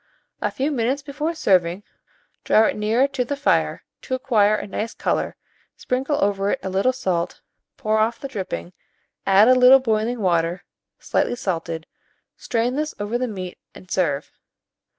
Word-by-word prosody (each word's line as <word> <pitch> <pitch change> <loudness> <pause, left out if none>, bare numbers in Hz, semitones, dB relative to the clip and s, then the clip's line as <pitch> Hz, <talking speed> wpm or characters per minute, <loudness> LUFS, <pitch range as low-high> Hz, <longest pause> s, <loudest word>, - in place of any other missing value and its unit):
A - - +1
few 275 +3 -2
minutes 265 +2 0
before 300 +3 -3
serving, 185 - +2 0.6
draw 220 - +5
it - - 0
nearer 220 +6 +2
the 270 -2 -2
the 285 +4 -3
fire 285 - +1 0.2
to 260 - -2
acquire 225 -6 +3
a - - -4
nice 215 +3 -4
colour, - - -1 0.4
sprinkle 270 +3 -1
over 200 0 +1
it 265 - 0
a 190 - -3
little 195 +7 +2
salt, 185 -9 -2 0.4
pour 215 0 +1
off 225 +2 +1
the 275 - -5
dripping, 180 - -5 0.5
add 200 +3 +6
a 255 - +7
little 255 +1 +7
boiling 230 -1 0
water 175 -1 +1 0.3
slightly - - 0
salted, 165 -6 -3 0.5
strain 240 +2 -1
this 305 +1 -2
over 210 +4 -2
the 255 - -1
meat 185 -5 -6 0.2
and 185 - -14
serve. 150 -6 0
220 Hz, 160 wpm, -22 LUFS, 190-255 Hz, 0.6 s, a